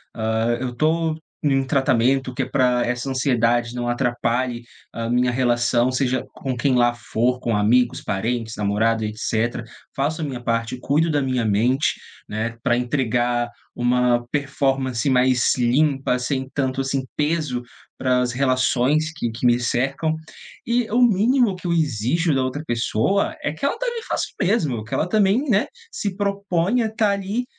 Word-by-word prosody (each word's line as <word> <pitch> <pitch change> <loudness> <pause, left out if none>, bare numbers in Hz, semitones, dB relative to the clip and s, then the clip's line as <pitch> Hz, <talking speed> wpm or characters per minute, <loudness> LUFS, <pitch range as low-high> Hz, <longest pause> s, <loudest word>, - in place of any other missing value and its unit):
Hã, 110 +1 0
eu 125 -1 -3
tô 160 +3 +1 0.3
num 135 -2 +2
tratamento 130 -1 +1
que 135 - -2
é 130 - 0
pra 125 -2 +2
essa 125 +2 -2
ansiedade 120 -2 +1
não 120 0 -3
atrapalhe 120 0 -1 0.3
a 115 0 -4
minha 125 +1 +2
relação, 120 0 +2
seja 130 0 0
com 130 -2 -4
quem 130 +1 +2
lá 120 -1 +3
for, 120 +2 -1
com 115 -3 -1
amigos, 120 +4 +2
parentes, 110 +2 -2
namorado, 110 +2 +1
etcétera. 110 +2 -2 0.3
Faço 150 +4 -1
a - - -1
minha 130 -4 -5
parte, 115 +1 -1
cuido 155 +5 +1
da 145 -1 +1
minha 130 -3 0
mente, 120 +7 +1 0.3
né, 115 +2 -3
pra 120 -3 +3
entregar 120 -1 0 0.3
uma 120 0 +2
performance 135 -3 0
mais 125 0 +3
limpa, 135 +1 +2
sem 130 +1 -2
tanto, 135 -1 0
assim, 135 0 -2
peso 150 -5 -1 0.4
para 125 -1 +2
as 125 - 0
relações 130 +4 +1
que 120 -6 -2
que 115 +2 -10
me 120 0 +4
cercam, 135 +6 0 0.5
e 235 -1 +1
o 240 +3 +3
mínimo 235 0 +3
que 180 - -13
eu 170 - +1
exijo 155 +2 +1
da 135 - +1
outra 130 +4 -3
pessoa 120 - 0
é - - -1
que 155 - -15
ela 280 - 0
também 480 -1 -2
faça - - -1
o - - +1
mesmo, 150 - 0
que 110 - -10
ela 160 - +1
também, 215 +6 +2
né, 205 -1 +3 0.3
se 205 - -3
proponha 200 +2 0
estar 220 -2 +1
ali, 200 +5 -2
130 Hz, 165 wpm, -22 LUFS, 120-155 Hz, 0.5 s, me